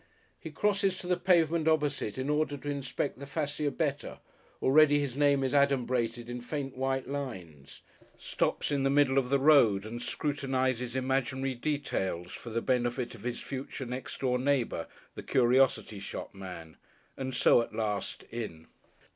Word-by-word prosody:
He - - -7
crosses 200 -2 +1
to - - -7
the 180 0 +2
pavement 170 -3 +2
opposite 145 -8 +1
in 130 +1 -2
order 150 -1 0
to 145 +1 -6
inspect 140 -1 -3
the 140 - -8
fascia 145 +1 -1
better, 145 0 -2 0.4
already 145 +2 +5
his 140 -4 -2
name 140 -1 +3
is 130 - -1
adumbrated 125 -4 +1
in 120 0 -5
faint 135 +1 -4
white 135 0 -1
lines; 95 - -7 0.4
stops - - -1
in 140 -1 +1
the 135 - +2
middle 135 -1 +4
of 125 -2 -3
the 140 - +4
road 130 -9 +5
and 120 +2 -6
scrutinises 130 -3 -1
imaginary 130 0 0
details 120 - -2
for 120 - -8
the 115 +1 -2
benefit 125 -1 0
of 115 - -12
his 120 +2 -4
future 135 0 -6
next 125 +1 -6
door 125 -2 +1
neighbour, 130 -10 0 0.3
the - - -7
curiosity 125 -4 +2
shop 100 - -6
man, 90 -5 -9 0.4
and 130 -1 -4
so 120 - +5
at 115 - -6
last, 105 -2 -2
in.... 105 -9 -6
130 Hz, 160 wpm, -30 LUFS, 120-145 Hz, 0.4 s, already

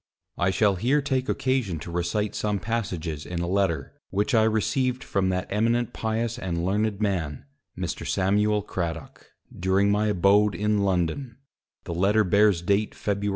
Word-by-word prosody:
I - - +2
shall 100 0 +2
here 125 +10 +2
take 135 -2 -1
occasion 130 -10 0
to 85 - -7
recite 90 +5 -1
some 105 -1 -1
Passages 90 -9 -3
in 90 -1 -5
a 85 - -1
Letter, 95 -3 0 0.2
which 105 +7 0
I 110 -1 +5
received 125 +4 0
from 95 -1 0
that 90 0 -1
Eminent 115 +3 +1
pious 115 +2 -2
and 85 -4 -2
learned 105 +2 0
Man, 85 -9 -2 0.3
Mr. - - -4
Samuel 105 +2 +1
Cradock; 85 -5 -5 0.3
during 95 +2 +2
my 105 +1 +2
abode 100 +1 +3
in 105 0 +1
London; 100 +6 -1 0.5
the - - -5
Letter 100 +5 +3
bears 100 -2 +3
date 100 +4 +1
_Febr. 100 0 -1
100 Hz, 155 wpm, -25 LUFS, 90-110 Hz, 0.5 s, I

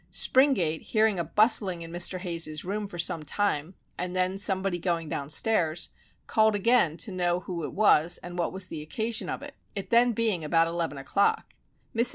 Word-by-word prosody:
Springate, 205 - +3
hearing 215 -4 +1
a - - 0
bustling 200 -4 +3
in 165 - -10
Mr. 175 +2 +1
Hayes's 165 -4 -3
room 205 +2 -3
for 175 - -10
some 170 -1 0
time, 160 0 -2 0.2
and 180 0 -4
then 185 +1 0
somebody 195 -2 +1
going 170 -2 -2
down 140 0 -4
stairs, 170 -2 +1 0.3
called 220 -1 +2
again 205 -6 +2
to 215 - -3
know 175 -1 0
who 175 -3 -6
it - - -4
was 175 -5 +3
and 175 0 -7
what 170 - -1
was 190 0 -1
the 160 -4 -7
occasion 220 +9 -4
of - - -5
it 285 -1 -8 0.2
(it 200 +2 -6 0.2
being 220 -5 0
then - - -10
about 165 +2 +2
eleven 165 -3 -3
o'clock). 140 +9 0 0.4
Mrs. 235 +2 +6
180 Hz, 190 wpm, -27 LUFS, 165-210 Hz, 0.4 s, Mrs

